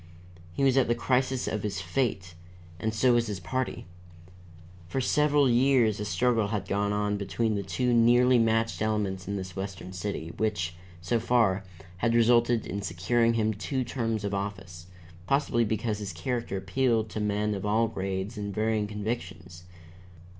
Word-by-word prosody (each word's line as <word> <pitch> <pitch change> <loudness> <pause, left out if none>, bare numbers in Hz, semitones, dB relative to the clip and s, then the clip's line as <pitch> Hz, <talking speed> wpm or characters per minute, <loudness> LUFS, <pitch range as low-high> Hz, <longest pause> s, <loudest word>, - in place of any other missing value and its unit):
He 140 - -1
was 135 -1 +4
at 135 - +4
the 120 - +2
crisis 130 +1 0
of 105 - -2
his 100 -2 -3
fate, 95 -5 -2 0.5
and 110 - -1
so 120 +3 +3
was 120 -1 +2
his 105 -3 -4
party. 125 +9 -3 1.0
For 135 - -2
several 145 +1 +3
years 120 -3 +3
a 105 - -3
struggle 115 0 +1
had 105 -1 -3
gone 100 0 0
on 105 0 0
between 110 +3 -1
the 100 - -1
two 100 +6 0
nearly 120 +2 +5
matched 115 0 +1
elements 105 -4 -1
in 100 - -2
this 95 -2 -6
western 95 -1 -6
city, 90 -3 -4
which, 95 -6 -1 0.3
so 115 +7 0
far, 110 -4 +2 0.3
had 115 +5 +1
resulted 120 0 +4
in 100 +2 -4
securing 110 +6 +1
him 110 -1 +1
two 130 +6 -2
terms 115 -3 -2
of 100 0 -2
office 95 -4 -5 0.4
possibly 135 -4 +2
because 110 0 -1
his 100 -3 -5
character 115 +4 -3
appealed 110 +4 +1
to 110 - -5
men 105 0 0
of 100 -2 -4
all 110 +2 +2
grades 95 +1 -4
and 100 -1 -4
varying 110 -1 0
convictions. 90 -5 -5
110 Hz, 165 wpm, -28 LUFS, 100-120 Hz, 1.0 s, nearly